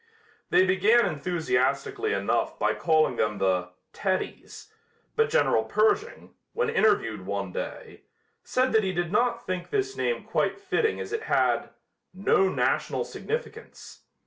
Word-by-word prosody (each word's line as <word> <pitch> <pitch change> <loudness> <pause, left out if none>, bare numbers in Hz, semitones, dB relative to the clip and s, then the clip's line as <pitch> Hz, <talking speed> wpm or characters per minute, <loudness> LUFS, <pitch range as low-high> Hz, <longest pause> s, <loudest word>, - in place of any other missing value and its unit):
They 185 - +5
began 205 +6 +4
enthusiastically 155 - -1
enough - - 0
by - - +1
calling 155 -7 +2
them 105 -1 0
the 95 -2 0 0.2
"Teddies," 190 - -4 0.4
but 450 0 +2
General - - +2
Pershing, 435 +1 0 0.2
when 470 -1 0
interviewed 115 - +1
one 100 -2 -3
day, - - -7 0.4
said 255 0 +1
that 220 -1 +3
he 190 -1 -1
did 175 -1 -2
not 235 +2 +1
think 185 -1 -4
this 400 -1 -1
name 480 - -1
quite - - -1
fitting 405 +3 0
as - - -6
it 445 - -1
had - - +2 0.5
"no 190 0 +3
national - - 0
significance." 470 +2 -7
195 Hz, 135 wpm, -26 LUFS, -, 0.5 s, They